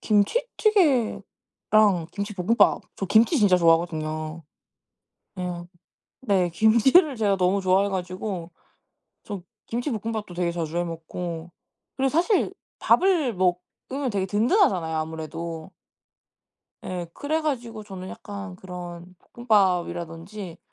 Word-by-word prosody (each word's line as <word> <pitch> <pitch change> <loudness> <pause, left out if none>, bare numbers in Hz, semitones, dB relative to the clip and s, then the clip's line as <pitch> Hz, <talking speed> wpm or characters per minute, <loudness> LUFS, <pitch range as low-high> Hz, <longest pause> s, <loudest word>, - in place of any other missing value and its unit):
김치찌개랑 295 - +2 0.9
김치볶음밥. 205 +1 +2
저 195 - -3
김치 225 - +4
진짜 200 -5 +5
좋아하거든요. 160 -1 +1 1.0
예. 175 -1 -4 0.6
네. 195 -7 +2
김치를 235 - +4
제가 205 -4 +1
너무 185 +2 +2
좋아해 190 +2 +3
가지고. 185 -1 -4 0.7
저 200 -4 -6 0.2
김치볶음밥도 225 -5 -3
되게 175 -1 -1
자주 165 -1 -4
해 175 - +1
먹고. 165 0 -6 0.5
그리고 270 0 +2
사실 355 +6 +2 0.2
밥을 335 - +3
먹으면 185 +9 -2
되게 195 -2 0
든든하잖아요 205 - +2
아무래도. 160 +1 -5 1.1
예. 180 -2 -4
그래가지고 285 -8 -2
저는 190 -2 -8
약간 200 -2 -8
그런 180 -1 -9 0.2
볶음밥이라든지 185 -4 -1
190 Hz, 265 characters per minute, -25 LUFS, 175-230 Hz, 1.1 s, 진짜